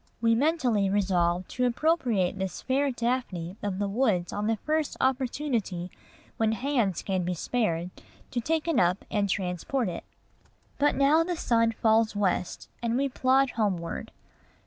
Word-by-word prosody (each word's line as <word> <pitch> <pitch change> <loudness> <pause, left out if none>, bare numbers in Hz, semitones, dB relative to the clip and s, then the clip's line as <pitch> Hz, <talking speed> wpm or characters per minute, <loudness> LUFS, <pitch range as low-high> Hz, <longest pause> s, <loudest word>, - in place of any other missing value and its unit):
We 230 0 +3
mentally 245 -7 +2
resolve 185 -3 +1
to 250 - 0
appropriate 240 - +1
this 190 -1 -4
fair 275 +2 +1
Daphne 235 -8 -2
of 200 -2 -2
the 205 0 -1
woods 200 -5 0
on 205 +1 -2
the 225 - +2
first 305 +7 -1
opportunity 245 - -1 0.5
when 220 -1 +2
hands 235 - 0
can 190 -2 -1
be 180 +1 -2
spared 175 -4 -1 0.4
to 240 - -1
take 320 +5 -1
it 330 - +2
up 180 +2 +1
and 205 -2 +1
transport 190 +7 -1
it. - - -6 0.8
But 290 +1 +3
now 295 +4 +4
the 355 +1 -2
sun 230 -5 +2
falls 220 -1 +2
west, 195 -3 -1
and 235 0 0
we 275 +1 +1
plod 260 +1 +2
homeward. 185 -7 -2
225 Hz, 150 wpm, -27 LUFS, 190-265 Hz, 0.8 s, now